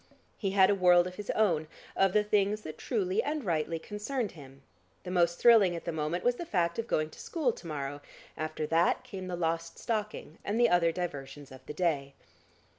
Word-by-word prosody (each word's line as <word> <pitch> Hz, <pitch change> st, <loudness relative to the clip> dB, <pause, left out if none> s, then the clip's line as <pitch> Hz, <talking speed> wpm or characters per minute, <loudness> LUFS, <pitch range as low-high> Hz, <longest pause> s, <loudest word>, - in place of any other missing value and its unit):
He 195 Hz, -, -2 dB
had 190 Hz, 0 st, +5 dB
a -, -, +4 dB
world 180 Hz, -2 st, +5 dB
of 180 Hz, -, -5 dB
his 205 Hz, +2 st, -8 dB
own, 170 Hz, -8 st, +2 dB, 0.3 s
of 195 Hz, -1 st, +3 dB
the 210 Hz, -, +4 dB
things 210 Hz, 0 st, +1 dB
that -, -, -8 dB
truly 390 Hz, +1 st, 0 dB
and 305 Hz, -, -3 dB
rightly 165 Hz, -3 st, -1 dB
concerned 210 Hz, +6 st, -3 dB
him. 135 Hz, -4 st, -14 dB, 0.4 s
The 180 Hz, -, -6 dB
most 175 Hz, -1 st, +2 dB
thrilling 215 Hz, -7 st, +6 dB
at 170 Hz, -, -7 dB
the 170 Hz, -, -1 dB
moment 160 Hz, +3 st, -2 dB
was 245 Hz, 0 st, +2 dB
the -, -, -4 dB
fact 170 Hz, -, 0 dB
of 230 Hz, -, -2 dB
going 155 Hz, -6 st, 0 dB
to -, -, -14 dB
school 305 Hz, -7 st, 0 dB
to 175 Hz, -, -11 dB
morrow, 145 Hz, -2 st, -4 dB, 0.3 s
after 155 Hz, 0 st, -3 dB
that 165 Hz, +9 st, +2 dB
came 195 Hz, -7 st, -7 dB
the 180 Hz, -, -3 dB
lost 165 Hz, -1 st, -2 dB
stocking 215 Hz, -8 st, -4 dB
and 215 Hz, +3 st, -1 dB
the 240 Hz, -1 st, +5 dB
other 170 Hz, -1 st, +4 dB
diversions 145 Hz, -5 st, -6 dB
of 130 Hz, 0 st, -12 dB
the -, -, -5 dB
day. 145 Hz, -6 st, -1 dB
180 Hz, 205 wpm, -30 LUFS, 160-210 Hz, 0.4 s, thrilling